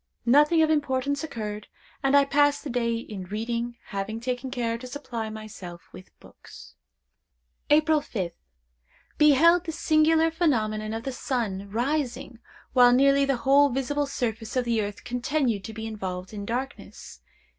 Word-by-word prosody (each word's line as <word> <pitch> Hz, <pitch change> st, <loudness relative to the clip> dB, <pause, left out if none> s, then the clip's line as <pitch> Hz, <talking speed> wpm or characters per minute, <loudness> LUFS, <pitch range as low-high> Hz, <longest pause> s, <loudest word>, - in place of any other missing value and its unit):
Nothing 295 Hz, +6 st, +5 dB
of 315 Hz, -, +2 dB
importance 280 Hz, -1 st, 0 dB
occurred, 215 Hz, -7 st, -5 dB, 0.3 s
and 275 Hz, +1 st, +4 dB
I 280 Hz, -, +5 dB
passed 290 Hz, +1 st, +2 dB
the 290 Hz, -, -5 dB
day 235 Hz, -1 st, 0 dB
in 210 Hz, -5 st, -6 dB
reading, 235 Hz, +4 st, -3 dB
having 200 Hz, +3 st, -4 dB
taken 250 Hz, +2 st, -3 dB
care 240 Hz, -3 st, -2 dB
to 255 Hz, -, -8 dB
supply 245 Hz, -5 st, -5 dB
myself 210 Hz, -5 st, -9 dB
with 185 Hz, -, -12 dB
books. -, -, -15 dB, 1.0 s
"April 310 Hz, 0 st, +4 dB
5th. 190 Hz, -11 st, -4 dB, 0.9 s
Beheld 325 Hz, +4 st, +5 dB
the 325 Hz, -, -3 dB
singular 320 Hz, +1 st, +3 dB
phenomenon 220 Hz, -10 st, 0 dB
of 225 Hz, -, -5 dB
the 270 Hz, -, -3 dB
sun 215 Hz, -7 st, -3 dB
rising 250 Hz, +1 st, -2 dB, 0.3 s
while 245 Hz, -1 st, +7 dB
nearly 275 Hz, +2 st, +4 dB
the 275 Hz, -2 st, 0 dB
whole 280 Hz, +1 st, +5 dB
visible 280 Hz, +3 st, -1 dB
surface 225 Hz, -4 st, -3 dB
of 250 Hz, -1 st, +1 dB
the 230 Hz, -2 st, +1 dB
earth 205 Hz, 0 st, -6 dB
continued 245 Hz, -3 st, -1 dB
to -, -, -6 dB
be 220 Hz, 0 st, -6 dB
involved 190 Hz, -3 st, -5 dB
in 205 Hz, -1 st, -6 dB
darkness. 255 Hz, +4 st, -6 dB
245 Hz, 150 wpm, -26 LUFS, 220-285 Hz, 1.0 s, while